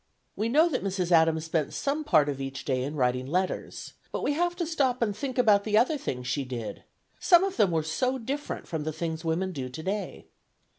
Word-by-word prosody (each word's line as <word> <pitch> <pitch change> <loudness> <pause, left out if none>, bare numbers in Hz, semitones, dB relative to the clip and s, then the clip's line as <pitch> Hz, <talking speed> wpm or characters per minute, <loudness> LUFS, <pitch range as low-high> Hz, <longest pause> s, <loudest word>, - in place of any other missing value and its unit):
We 220 +2 -1
know 310 +7 +5
that 295 -7 -2
Mrs. 185 -2 -1
Adams 160 -1 +4
spent 160 -2 -1
some 290 +2 -1
part 155 - +4
of 140 -2 -3
each 135 0 -5
day 130 -2 0
in 145 +3 -4
writing 125 -1 0
letters; 185 +5 -2 0.2
but - - -3
we 290 - +1
have 350 +3 0
to 345 - -2
stop 275 -6 0
and 210 -3 -1
think 260 +4 -4
about 210 -5 +5
the 215 0 +2
other 255 +8 +3
things 125 - -4
she 125 +3 -1
did, 120 -4 -6 0.4
some 350 0 +6
of 390 -1 -1
them 210 -5 +4
were 160 -2 0
so 255 +12 0
different 275 +5 -4
from 160 -3 -3
the 155 +1 -3
things 160 +1 -4
women 170 +3 -1
do 135 -6 -5
today. 190 +10 -4
185 Hz, 215 wpm, -27 LUFS, -, 0.4 s, some